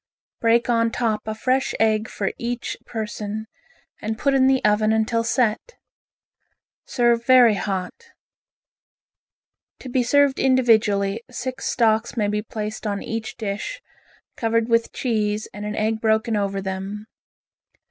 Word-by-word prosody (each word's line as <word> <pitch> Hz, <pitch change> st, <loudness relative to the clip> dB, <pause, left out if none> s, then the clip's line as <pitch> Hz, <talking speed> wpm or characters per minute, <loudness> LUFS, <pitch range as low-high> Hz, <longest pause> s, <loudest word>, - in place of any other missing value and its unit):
Break 230 Hz, 0 st, +3 dB
on 230 Hz, -1 st, +2 dB
top 225 Hz, -3 st, -2 dB
a 220 Hz, -, -2 dB
fresh 260 Hz, +4 st, 0 dB
egg 220 Hz, 0 st, +2 dB
for 195 Hz, -, -2 dB
each 240 Hz, 0 st, -3 dB
person, 220 Hz, -1 st, -4 dB, 0.6 s
and 220 Hz, 0 st, -3 dB
put 275 Hz, +4 st, +1 dB
in 265 Hz, -1 st, +4 dB
the 265 Hz, -1 st, +2 dB
oven 215 Hz, +1 st, +3 dB
until 220 Hz, +1 st, +1 dB
set. 235 Hz, -, 0 dB, 1.1 s
Serve 235 Hz, -2 st, +2 dB
very 245 Hz, -2 st, +6 dB
hot. 195 Hz, -, -4 dB, 1.7 s
To 260 Hz, -, -9 dB
be 250 Hz, +1 st, +1 dB
served 280 Hz, +2 st, +3 dB
individually, 225 Hz, -5 st, +3 dB
six 255 Hz, +1 st, -5 dB
stalks 225 Hz, 0 st, +1 dB
may 210 Hz, -2 st, +1 dB
be 210 Hz, 0 st, -1 dB
placed 215 Hz, 0 st, -5 dB
on 200 Hz, -1 st, -3 dB
each 225 Hz, -1 st, -5 dB
dish, 220 Hz, -, -4 dB, 0.6 s
covered 230 Hz, 0 st, 0 dB
with 230 Hz, 0 st, +2 dB
cheese, 215 Hz, -3 st, -1 dB
and 205 Hz, 0 st, -6 dB
an 210 Hz, -, -4 dB
egg 220 Hz, +1 st, -1 dB
broken 220 Hz, +1 st, +1 dB
over 195 Hz, -1 st, -1 dB
them. 195 Hz, +2 st, -5 dB
225 Hz, 135 wpm, -22 LUFS, 210-240 Hz, 1.7 s, very